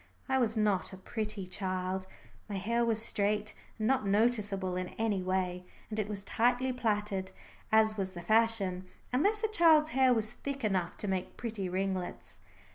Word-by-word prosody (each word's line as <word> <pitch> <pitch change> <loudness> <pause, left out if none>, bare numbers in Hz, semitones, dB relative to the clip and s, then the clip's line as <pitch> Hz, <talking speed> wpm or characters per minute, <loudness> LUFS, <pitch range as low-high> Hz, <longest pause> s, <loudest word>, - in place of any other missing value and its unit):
I 265 -1 +2
was 225 -2 +1
not 205 -3 +1
a - - -8
pretty 210 0 -4
child. 185 0 -3 0.4
My 205 - -3
hair 230 +5 0
was 225 -2 +1
straight 210 -1 +1 0.2
and 215 - -2
not 260 0 +2
noticeable 205 -3 +1
in 185 0 -2
any 220 -4 0
way, 180 -1 -1 0.3
and 215 - -2
it 210 - -1
was 200 -2 -4
tightly 245 +4 +1
plaited, 210 -5 -1 0.4
as 220 0 +4
was 190 -1 -2
the 175 - -7
fashion, 200 -3 +2 0.3
unless 410 - +2
a - - +4
child's 325 -7 +5
hair 260 -1 +4
was 220 -2 +1
thick 275 0 -5
enough 185 -5 0
to 210 - -4
make 190 -1 -3
pretty 215 -6 -3
ringlets. 185 0 -3
210 Hz, 170 wpm, -31 LUFS, 190-235 Hz, 0.4 s, child's